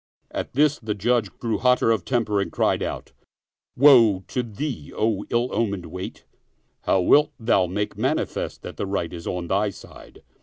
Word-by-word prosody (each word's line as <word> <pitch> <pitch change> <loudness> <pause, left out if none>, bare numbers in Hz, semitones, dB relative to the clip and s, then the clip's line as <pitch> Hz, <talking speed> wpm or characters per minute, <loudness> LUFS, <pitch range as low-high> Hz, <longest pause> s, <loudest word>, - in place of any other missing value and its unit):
At - - -5
this 150 +2 +3
the 110 -2 -3
Judge 115 0 +1
grew 115 -2 -2
hotter 125 -2 +3
of 110 -6 0
temper 110 -5 0
and - - -4
cried - - +1
out, - - -5 0.3
" - - -46
Woe 120 -8 +6
to 125 - -1
thee, 120 - -5
O 110 -2 0
ill 120 +2 0
omened 100 -6 -1
wight 95 +1 -7 0.6
I - - +3
How 95 - +4
wilt 150 +11 +4
thou 100 -5 +2
make 105 +4 -3
manifest - - -2
that - - -8
the 100 - -3
right 95 -4 -2
is 85 -1 -7
on 90 -1 -3
thy 100 +4 +1
side?" 100 - -14
110 Hz, 185 wpm, -24 LUFS, 95-120 Hz, 0.6 s, Woe